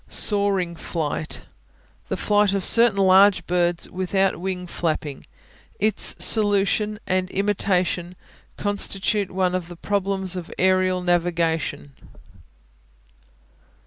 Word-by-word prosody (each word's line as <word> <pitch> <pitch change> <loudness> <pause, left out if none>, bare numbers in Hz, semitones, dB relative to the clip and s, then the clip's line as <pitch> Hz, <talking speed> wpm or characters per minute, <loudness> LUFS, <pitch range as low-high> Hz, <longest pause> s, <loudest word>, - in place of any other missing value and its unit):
Soaring 200 -4 0
Flight 160 -2 -4 0.6
The - - -3
flight 205 -1 +2
of 195 - -1
certain 230 -3 +4
large 195 +1 +5
birds 175 -1 0
without 190 +1 0
wing 185 0 -4
flapping. 155 -5 -4 0.5
Its 215 0 +2
solution 210 0 +3
and 185 0 -1
imitation 185 -3 -1 0.4
constitute 205 0 -1
one 185 -1 -1
of 185 -2 -3
the 175 - -10
problems 190 0 -2
of 175 -2 -7
aerial 185 0 +2
navigation. 165 -5 -1
185 Hz, 100 wpm, -22 LUFS, 175-200 Hz, 0.6 s, large